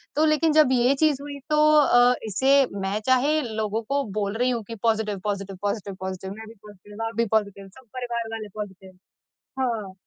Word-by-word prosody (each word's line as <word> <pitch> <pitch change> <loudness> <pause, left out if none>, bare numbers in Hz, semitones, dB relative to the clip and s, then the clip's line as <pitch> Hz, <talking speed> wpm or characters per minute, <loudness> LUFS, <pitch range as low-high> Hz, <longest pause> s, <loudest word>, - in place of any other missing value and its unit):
तो 305 +2 +3
लेकिन 310 +1 +3
जब 305 -4 +5
ये 250 +1 +3
चीज़ 290 -2 +1
हुई 285 -1 -7
तो 300 - +2 0.2
अ, 245 -3 +5
इसे 270 +7 +3 0.2
मैं 195 +2 -1
चाहे 280 +4 +3
लोगों 220 -2 -2
को 280 0 +1 0.2
बोल 200 -1 -1
रही 250 +1 +2
हूँ 235 -3 -2
कि 230 - -6
पॉजिटिव, 215 -2 -1
पॉजिटिव, 200 -2 -3
पॉजिटिव, 205 -1 -3
पॉजिटिव। 190 0 -5
मैं 220 +1 -10
भी 225 - -11
पॉजिटिव, 205 +2 -10
आप 225 - -5
भी 230 +1 +1
पॉजिटिव, 200 -2 -1
सब 255 +7 -18
परिवार 235 -2 -3
वाले 220 -1 -5
पॉजिटिव। 190 -2 -8 0.7
हाँ, 225 -7 -2
225 Hz, 190 wpm, -24 LUFS, 205-260 Hz, 0.7 s, जब